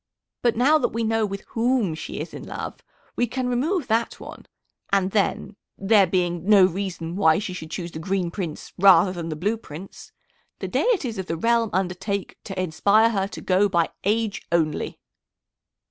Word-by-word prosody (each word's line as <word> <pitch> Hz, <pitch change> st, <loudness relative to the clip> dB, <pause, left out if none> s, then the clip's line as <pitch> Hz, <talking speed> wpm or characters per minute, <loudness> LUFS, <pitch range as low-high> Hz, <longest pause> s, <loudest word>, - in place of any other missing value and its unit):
But 240 Hz, -2 st, +2 dB
now 280 Hz, +7 st, +4 dB
that -, -, +2 dB
we 230 Hz, +1 st, -1 dB
know 225 Hz, -1 st, +1 dB
with 195 Hz, 0 st, -5 dB
whom 235 Hz, -6 st, +1 dB
she 155 Hz, -, -6 dB
is -, -, -6 dB
in -, -, -7 dB
love, -, -, -6 dB, 0.4 s
we 245 Hz, -, +1 dB
can 255 Hz, +2 st, -2 dB
remove 285 Hz, +7 st, 0 dB
that 230 Hz, 0 st, 0 dB
one, -, -, -11 dB, 0.4 s
and 195 Hz, -1 st, +2 dB
then, 205 Hz, 0 st, 0 dB, 0.2 s
there 195 Hz, -1 st, +4 dB
being 175 Hz, -2 st, 0 dB
no 200 Hz, -3 st, +8 dB
reason 180 Hz, -2 st, -3 dB
why 160 Hz, -5 st, +4 dB
she 200 Hz, -3 st, -4 dB
should 160 Hz, -3 st, -7 dB
choose 175 Hz, +1 st, -5 dB
the 160 Hz, -, -7 dB
Green 180 Hz, 0 st, -1 dB
Prince 170 Hz, -5 st, -6 dB
rather 185 Hz, -1 st, +7 dB
than 170 Hz, -2 st, -5 dB
the 155 Hz, -, -3 dB
Blue 205 Hz, +9 st, -1 dB
Prince, 185 Hz, -2 st, -11 dB, 0.5 s
the -, -, -5 dB
deities 310 Hz, -, 0 dB
of 190 Hz, -, -4 dB
the 165 Hz, -, -2 dB
realm 230 Hz, +4 st, +2 dB
undertake 190 Hz, +2 st, -2 dB
to 190 Hz, -1 st, -5 dB
inspire 200 Hz, +6 st, +3 dB
her 195 Hz, -3 st, 0 dB
to -, -, -9 dB
go 195 Hz, +2 st, +2 dB
by 170 Hz, -3 st, +1 dB
age 215 Hz, +1 st, 0 dB
only." 160 Hz, -3 st, 0 dB
195 Hz, 180 wpm, -24 LUFS, 175-225 Hz, 0.5 s, no